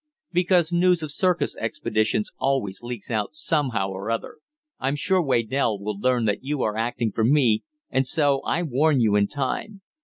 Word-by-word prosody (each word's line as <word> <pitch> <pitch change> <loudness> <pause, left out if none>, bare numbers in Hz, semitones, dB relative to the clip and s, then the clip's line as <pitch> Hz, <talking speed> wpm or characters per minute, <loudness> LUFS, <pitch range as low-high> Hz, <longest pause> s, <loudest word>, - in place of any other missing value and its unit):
"Because 175 -1 +2
news 175 -1 +3
of 155 - -4
circus 180 +3 0
expeditions 110 0 -1
always 130 -9 -1
leaks 120 -2 -7
out 110 +6 -2
somehow 135 - 0
or 95 +3 -5
other. 115 0 -3 0.4
I'm 135 +2 0
sure 185 +5 +2
Waydell 120 -4 +1
will 100 0 -4
learn 125 0 +1
that 105 +3 -1
you 140 0 -1
are 105 - -1
acting 115 0 -1
for 110 - -1
me, 125 -3 +3 0.3
and 130 -1 +1
so 140 -2 +2
I 175 - -1
warn 150 0 +2
you 110 -3 +3
in 100 0 +3
time. 165 - -4
130 Hz, 175 wpm, -24 LUFS, 110-155 Hz, 0.4 s, news